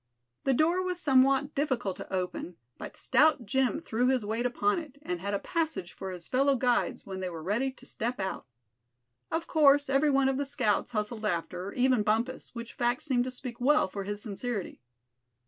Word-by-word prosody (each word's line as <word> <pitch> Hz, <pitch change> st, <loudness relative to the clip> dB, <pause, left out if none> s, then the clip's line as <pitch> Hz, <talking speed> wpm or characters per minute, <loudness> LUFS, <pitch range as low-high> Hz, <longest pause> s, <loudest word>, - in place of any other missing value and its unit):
The 270 Hz, -, +3 dB
door 335 Hz, +6 st, +3 dB
was 365 Hz, -1 st, -2 dB
somewhat 275 Hz, -1 st, +3 dB
difficult 250 Hz, -9 st, -1 dB
to -, -, -9 dB
open, 180 Hz, -2 st, -3 dB, 0.2 s
but -, -, -8 dB
stout 310 Hz, -6 st, +3 dB
Jim 255 Hz, +1 st, +1 dB
threw 240 Hz, +3 st, 0 dB
his 255 Hz, -4 st, +1 dB
weight 225 Hz, +4 st, 0 dB
upon 205 Hz, 0 st, +1 dB
it, 295 Hz, -4 st, -10 dB
and 180 Hz, -, -3 dB
had 200 Hz, +1 st, -1 dB
a -, -, +2 dB
passage 320 Hz, -, -2 dB
for 190 Hz, -, -6 dB
his 180 Hz, -2 st, -7 dB
fellow 275 Hz, +2 st, +3 dB
guides 245 Hz, -1 st, 0 dB
when 190 Hz, -1 st, -6 dB
they 185 Hz, -1 st, -3 dB
were 165 Hz, -2 st, -7 dB
ready 230 Hz, +9 st, 0 dB
to -, -, -15 dB
step 235 Hz, +1 st, -3 dB
out. 190 Hz, -8 st, -3 dB, 0.8 s
Of 330 Hz, +1 st, -1 dB
course 285 Hz, -2 st, +4 dB
every 275 Hz, +2 st, +3 dB
one 275 Hz, -1 st, +3 dB
of 270 Hz, -1 st, +1 dB
the 285 Hz, -, -1 dB
scouts 215 Hz, -7 st, +1 dB
hustled 215 Hz, +1 st, -2 dB
after, 180 Hz, +1 st, -3 dB
even 255 Hz, -2 st, +3 dB
Bumpus, 225 Hz, +5 st, -1 dB
which 235 Hz, 0 st, -7 dB
fact 240 Hz, +1 st, 0 dB
seemed 250 Hz, -5 st, +1 dB
to -, -, -2 dB
speak 250 Hz, -1 st, -7 dB
well 295 Hz, +1 st, +4 dB
for 200 Hz, +1 st, -5 dB
his 205 Hz, +1 st, -5 dB
sincerity. 215 Hz, -, -4 dB
245 Hz, 195 wpm, -29 LUFS, 205-275 Hz, 0.8 s, course